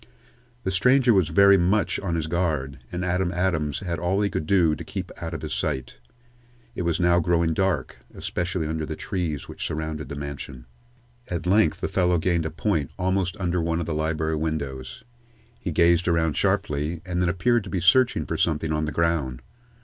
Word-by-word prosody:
The 95 - -1
stranger 125 +6 +4
was 95 -5 +3
very 100 -1 +6
much 95 +4 +1
on 90 -4 -2
his 80 -2 -1
guard, 80 -6 -1
and 90 +1 -3
Adam 90 0 0
Adams 85 -5 0
had 85 -4 -3
all 90 +3 0
he 100 -2 +1
could 75 - -3
do 85 -5 +4
to - - -5
keep 95 -2 -6
out 80 -1 -4
of 80 - -7
his 75 0 -3
sight. 65 -4 -3 0.7
It - - -4
was 85 -1 0
now 85 0 +4
growing 85 -1 +2
dark, 85 -6 -1
especially 90 -1 -3
under 80 0 -2
the 80 0 -4
trees 85 -8 -3
which - - -7
surrounded 80 -1 -4
the - - -5
mansion. 70 -3 -7 0.6
At 85 -1 -4
length 95 -2 +3
the - - 0
fellow 90 -1 +2
gained 85 -1 +1
a - - -4
point 80 -3 -1
almost 95 -1 0
under 90 -1 0
one 80 0 0
of 85 - -2
the 80 - -2
library 80 0 -1
windows. 70 - -4 0.6
He 90 - -4
gazed 85 +2 +3
around 80 -3 +2
sharply, 75 +3 0
and 90 -1 -2
then 90 - +2
appeared 115 +6 +2
to - - -7
be 95 - -1
searching 110 +9 +4
for - - -3
something 80 -1 +1
on 75 0 0
the 75 - -3
ground. 75 -6 0
85 Hz, 195 wpm, -25 LUFS, 75-90 Hz, 0.7 s, very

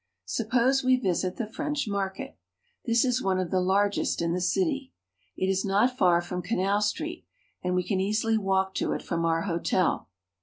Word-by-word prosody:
Suppose 250 - +1
we 255 0 +5
visit 185 -6 -1
the 235 - -3
French 290 +6 -3
market. 195 -2 -3 0.5
This 230 +2 +3
is 250 0 +1
one 190 -1 +1
of 185 -2 -2
the 185 - +2
largest 200 +2 +1
in 170 0 0
the 180 - -1
city. 280 - 0 0.4
It - - 0
is 190 0 +1
not 210 +6 +2
far 175 -6 +4
from 180 +1 -4
Canal 200 0 0
Street, 315 +11 -2 0.4
and 180 0 -1
we 180 - +1
can 190 0 -1
easily 215 +3 +1
walk 190 -2 +1
to - - 0
it - - -4
from 165 -1 -1
our 165 0 +1
hotel. 175 - 0
195 Hz, 185 wpm, -27 LUFS, 180-235 Hz, 0.5 s, we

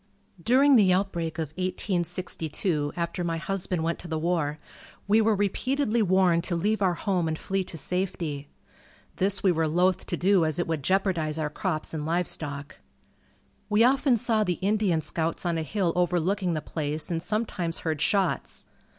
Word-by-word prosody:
During 265 - +5
the 195 -4 +5
outbreak 180 -4 -1
of 160 -3 -2
1862, 175 -3 -2
after 170 +1 -2
my 165 -1 -1
husband 180 -1 -2
went 165 +1 -1
to 175 - -9
the 160 -1 -2
war, 155 -2 0 0.5
we 215 +2 +5
were 220 0 +3
repeatedly 235 +4 0
warned 185 -3 +3
to 175 - -1
leave 210 +5 0
our 185 -3 +2
home 180 -3 0
and 160 0 -2
flee 195 +3 -2
to 170 - -8
safety. 165 -4 -2 0.7
This 195 +1 +1
we 190 - +5
were 160 -2 +1
loath 180 +3 +1
to 175 - -2
do 190 0 +3
as 155 -1 0
it 175 - 0
would 160 -3 -2
jeopardize 170 -2 0
our 150 -2 -2
crops 155 -1 -2
and 155 -2 -3
livestock. 150 -3 -2 0.9
We 210 +2 +4
often 265 0 +4
saw 220 0 +1
the 180 - 0
Indian 195 -3 +1
scouts 160 +3 -2
on 170 -2 0
a - - -1
hill 175 +1 -1
overlooking 180 +1 +1
the 155 - -2
place 155 +1 -3
and 165 -1 -1
sometimes 190 -5 -2
heard 155 -3 -2
shots. 195 -4 0
175 Hz, 170 wpm, -27 LUFS, 160-195 Hz, 0.9 s, During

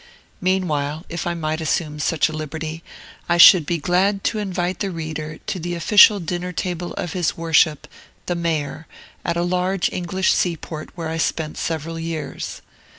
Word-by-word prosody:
Meanwhile, 160 -5 0
if 170 +1 -4
I 175 - -1
might 155 -1 -2
assume 155 -1 -1
such 155 +1 +2
a 155 - -6
liberty, 155 +1 -5 0.5
I 170 - +3
should 170 -2 +9
be 170 - 0
glad 190 +5 +1
to 220 - 0
invite 185 -3 -2
the 200 - -1
reader 155 -3 -5
to 185 - -3
the 175 +1 -3
official 205 +4 +6
dinner 175 +1 -3
table 175 0 -3
of 175 - -4
his 180 -3 -1
Worship, 160 -2 +2 0.4
the 175 - -1
Mayor, 160 -2 -2 0.4
at 170 0 -1
a 170 - +1
large 180 +1 0
English 185 +1 +1
seaport 165 -3 -2
where 165 -2 -3
I 160 - -3
spent 160 -1 -1
several 165 0 -3
years. 165 -1 -5
170 Hz, 165 wpm, -21 LUFS, 155-180 Hz, 0.5 s, should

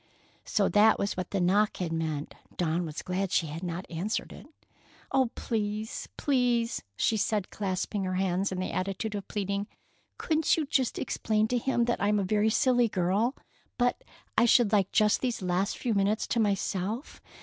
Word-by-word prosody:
So - - +2
that 215 +1 +5
was 200 - -1
what 185 -1 -4
the 200 - -1
knock 200 +4 +2
had 170 -3 -2
meant! 155 -2 -3 0.2
Dawn 170 0 0
was 155 +1 -6
glad 185 +1 -2
she - - +2
had 155 +2 -6
not 180 +1 -4
answered 180 +6 -3
it. - - -12 0.6
"Oh, 265 -3 +3
please, 215 -1 -3
please," 245 -4 +1 0.2
she 220 - +2
said, 210 -2 -1
clasping 195 0 -2
her 185 0 -2
hands 190 +1 0
in 185 - -3
the 185 - -2
attitude 195 +3 -2
of 200 -2 -5
pleading, 200 0 -2 0.5
"couldn't 315 -1 +2
you 315 - 0
just 265 -3 0
explain 215 -3 0
to 245 - +1
him 240 -1 +1
that 240 - -1
I'm 205 +1 +2
a 200 - +1
very 210 +3 +2
silly 245 0 +3
girl, 200 +6 +1 0.4
but 245 - +1 0.3
I 230 - +5
should 235 -2 +5
like 200 -3 +2
just 210 -1 +3
these 245 -6 -2
last 180 +2 0
few 240 - -1
minutes 200 +2 +1
to 235 - +1
myself. 205 +3 -1
205 Hz, 180 wpm, -29 LUFS, 185-230 Hz, 0.6 s, that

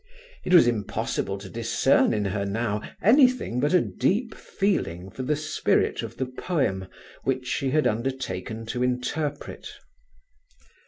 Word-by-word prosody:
It - - -3
was 175 -7 +8
impossible 105 -3 -1
to 100 0 -9
discern 115 +5 +2
in 105 -3 0
her 100 +1 -1
now 105 +1 -1 0.2
anything 250 - +4
but 145 +3 +1
a 180 - +5
deep 225 +4 0
feeling 95 - -2
for 115 - -6
the 145 +4 0
spirit 150 +1 0
of - - -7
the 130 - -1
poem 130 - -2 0.4
which 130 -1 -1
she 135 +1 -1
had 155 +3 +2
undertaken 115 -3 -2
to 125 +2 -3
interpret. 130 +4 -2
125 Hz, 140 wpm, -25 LUFS, 105-150 Hz, 0.4 s, was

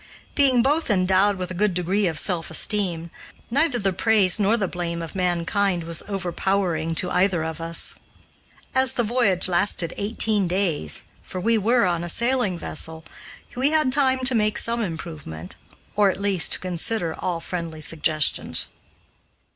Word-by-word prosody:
Being 260 -5 +4
both 295 +3 +1
endowed 190 0 +3
with 185 -1 -5
a - - -3
good 195 0 0
degree 185 +3 +1
of 160 -3 -3
self 175 -3 0
esteem, 170 -2 -1 0.4
neither 285 0 +2
the 195 -4 0
praise 205 -1 +3
nor 210 +3 +3
the 200 -4 -1
blame 170 -1 -4
of 165 -1 -7
mankind 180 0 0
was 165 0 0
overpowering 180 -3 -1
to 180 +3 +1
either 180 -3 +2
of 160 +1 -5
us. 165 0 -1 0.8
As 260 0 +3
the 240 - 0
voyage 210 -6 +2
lasted 175 -1 +2
eighteen 210 -1 +1
days 170 - -1 0.2
for 185 - -7
we 230 +5 +2
were 230 +2 +3
on 175 -2 0
a 175 - -5
sailing 235 -4 +1
vessel 160 0 -4 0.5
we 260 +3 +2
had 310 -4 +2
time 260 -2 +1
to 260 - +3
make 215 -2 +1
some 235 0 0
improvement, 160 - -6 0.4
or, 205 -1 +4
at 190 - -3
least, 200 -4 +2
to - - -3
consider 180 0 -2
all 175 0 -3
friendly 165 -2 -5
suggestions. 155 -1 +1
185 Hz, 160 wpm, -23 LUFS, 170-220 Hz, 0.8 s, Being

